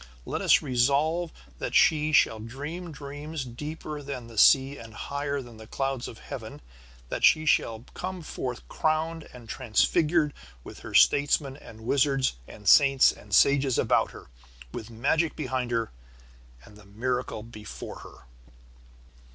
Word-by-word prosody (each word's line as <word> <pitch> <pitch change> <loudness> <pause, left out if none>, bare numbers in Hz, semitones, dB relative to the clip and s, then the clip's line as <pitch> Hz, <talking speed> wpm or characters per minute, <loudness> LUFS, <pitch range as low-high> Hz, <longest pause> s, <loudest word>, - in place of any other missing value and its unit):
Let - - -3
us - - +4
resolve 145 +7 +1 0.3
that - - -3
she 155 -1 +4
shall 110 -7 +4
dream 145 +10 -7
dreams 145 +1 -6
deeper 150 +4 -7
than 135 -4 -6
the 115 -1 -13
sea 135 +3 +5
and 115 -2 -11
higher 140 +1 -3
than 120 -2 -13
the 110 0 -12
clouds 135 0 -2
of 115 - -10
heaven, - - -8 0.5
that - - -4
she 155 0 +5
shall 115 -5 +1
come 185 -1 -5
forth 125 -4 -5
crowned 160 +1 -1
and 120 -2 -13
transfigured 150 +7 +1 0.3
with - - -11
her - - -8
statesmen 145 -1 +4
and 115 -6 -13
wizards 135 - +1
and 105 -2 -11
saints 135 -2 +6
and 100 -2 -4
sages 140 0 +4
about - - +2
her, - - -12 0.5
with 110 - -7
magic 145 +8 0
behind 130 -4 -2
her 115 -2 -1 0.7
and 105 -1 -17
miracle 125 -2 -2
before 110 -2 -9
her. - - -14
135 Hz, 145 wpm, -27 LUFS, 115-150 Hz, 0.7 s, saints